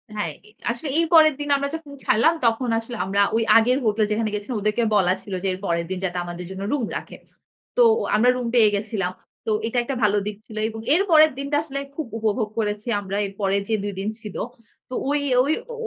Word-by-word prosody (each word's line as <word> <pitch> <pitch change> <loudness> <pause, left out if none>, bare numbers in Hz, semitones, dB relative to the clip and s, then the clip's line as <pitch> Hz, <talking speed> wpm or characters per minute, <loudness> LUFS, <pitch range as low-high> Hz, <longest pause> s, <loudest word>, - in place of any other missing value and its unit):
হ্যাঁ, 205 -6 -2 0.2
এ - - -18 0.2
আসলে 240 +6 -5
এই 335 - +3
পরের 310 -2 +7
দিন 290 0 -4
আমরা 280 0 -2
যখন 320 -3 -9
ছাড়লাম, 235 +10 +4
তখন 235 +2 +1
আসলে 230 +1 -8
আমরা 200 +1 +1
ওই 230 - +2
আগের 245 +3 +4
হোটেল 215 0 +2
যেখানে 215 +1 0
গেছিলাম, 210 +3 -3
ওদেরকে 215 +3 +1
বলা 185 -3 +4
ছিল 200 - -8
যে, - - 0
এর 185 - -6
পরের 170 -2 0
দিন 190 - -2
যাতে 180 -1 -3
আমাদের 175 +1 -6
জন্য 190 0 -6
রুম 280 -5 0
রাখে। - - -9 0.6
তো - - +7 0.3
আমরা 230 +4 +4
রুম 250 -1 -3
পেয়ে 220 -3 +6
গেছিলাম। 200 -3 -2 0.4
তো - - +1 0.2
এটা 230 - -3
একটা 270 +3 -3
ভালো 210 0 +3
দিক 210 -1 -4
ছিল। 220 -3 -10
এবং 225 0 -7
এর 350 - +4
পরের 310 -1 +7
দিনটা 280 +1 -1
আসলে 275 -3 -5 0.2
খুব 315 - -3
উপভোগ 220 0 0
করেছি 210 +1 -2
আমরা 195 0 -4
এর 195 - -7
পরের 195 0 +1
যে 220 - +2
২ 205 0 -3
দিন 200 +2 -2
ছিল। 210 -3 -9 0.5
তো - - -8 0.2
ওই, 290 +1 +2 0.2
ওই 285 - 0 0.2
অ - - -5
220 Hz, 225 wpm, -23 LUFS, 200-260 Hz, 0.6 s, পরের